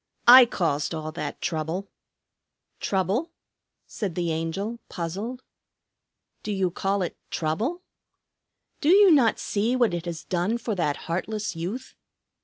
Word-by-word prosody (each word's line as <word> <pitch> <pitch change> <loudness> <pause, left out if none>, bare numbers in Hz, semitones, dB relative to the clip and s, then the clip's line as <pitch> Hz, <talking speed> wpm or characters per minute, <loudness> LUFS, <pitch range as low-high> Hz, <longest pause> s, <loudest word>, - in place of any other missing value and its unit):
I 250 0 +11
caused 165 -7 -1
all 155 0 -4
that 150 -3 -5
trouble." 165 +4 -2 0.9
"Trouble?" 195 - 0 0.6
said 195 -6 -4
the 175 -2 -1
Angel, 190 +8 -3
puzzled. 200 +9 -5 1.0
"Do 215 - -4
you 190 -3 0
call 195 +2 0
it 175 - -5
trouble? 225 - -2 1.0
Do 295 - +1
you 390 +1 +7
not 260 -8 +4
see 220 +5 0
what 240 -7 +2
it 175 0 -3
has 170 -1 -5
done 185 +5 0
for 230 -1 -3
that 160 -7 -2
heartless 205 +4 -3
youth? 195 +11 -5
195 Hz, 130 wpm, -25 LUFS, 165-235 Hz, 1.0 s, I